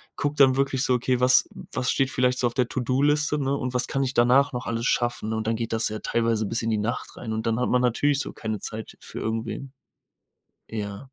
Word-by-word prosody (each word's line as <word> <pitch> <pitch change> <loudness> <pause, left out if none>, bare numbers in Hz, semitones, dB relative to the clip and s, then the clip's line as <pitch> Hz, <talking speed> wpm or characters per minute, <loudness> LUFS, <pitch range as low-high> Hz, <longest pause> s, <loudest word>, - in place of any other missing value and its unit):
gucke 145 0 -2
dann 135 -2 +6
wirklich 135 -1 +1
so: 130 - +2
„Okay 125 +1 0
was 125 +1 +5 0.3
was 130 0 0
steht 135 -1 +1
vielleicht 125 0 +1
so 125 - +3
auf 120 - -4
der 125 -2 +2
To-do-Liste“, 145 +4 +1
ne? 140 -1 0
Und 130 -2 -3
was 125 - +2
kann 135 0 0
ich 130 - -2
danach 125 +4 +4
noch 125 +1 -4
alles 115 +1 -2
schaffen? 120 -2 0
Und 110 -1 -2
dann 115 - +1
geht 115 -1 -3
das 110 -1 +1
ja 110 - -5
teilweise 115 -2 0
bis 115 +3 -1
in 115 - 0
die 110 - +1
Nacht 120 +4 -3
rein 110 -2 -5
und 110 +1 -3
dann 115 +1 0
hat 125 - 0
man 125 0 +3
natürlich 140 +4 +2
so - - -3
keine 110 -3 -4
Zeit 110 0 -7
für - - -8
irgendwen. 115 +4 -4 1.0
Ja. 105 +1 -5
125 Hz, 235 wpm, -25 LUFS, 115-135 Hz, 1.0 s, dann